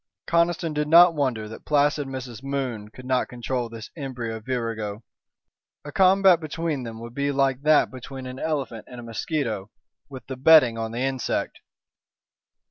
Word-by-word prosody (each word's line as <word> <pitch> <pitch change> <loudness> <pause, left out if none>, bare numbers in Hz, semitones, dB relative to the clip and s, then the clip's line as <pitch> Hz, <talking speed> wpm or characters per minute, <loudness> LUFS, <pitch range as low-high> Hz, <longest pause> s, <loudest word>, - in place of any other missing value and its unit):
Conniston 170 -1 +1
did 150 0 -1
not 170 +2 +8
wonder 130 -8 -1
that 110 - -10
placid 145 -1 +2
Mrs. 130 -3 -7
Moon 130 -6 -3
could 130 +3 -13
not 130 -1 +1
control 125 0 -3
this 115 -1 -9
embryo 125 -7 -5
virago. 110 -3 -4 0.8
A 145 - -7
combat 190 0 +5
between 155 -2 -3
them 115 -2 -7
would 115 0 -9
be 140 +2 0
like 135 -1 +1
that 155 +1 +4
between 130 +1 -8
an 130 +1 -7
elephant 140 -8 -3
and 125 - -10
a - - -8
mosquito, 115 -3 -3 0.4
with 130 -2 -10
the 130 - -6
betting 135 -4 +6
on 115 -1 -4
the 120 +2 -4
insect. 130 -2 -2
130 Hz, 160 wpm, -24 LUFS, 115-150 Hz, 0.8 s, not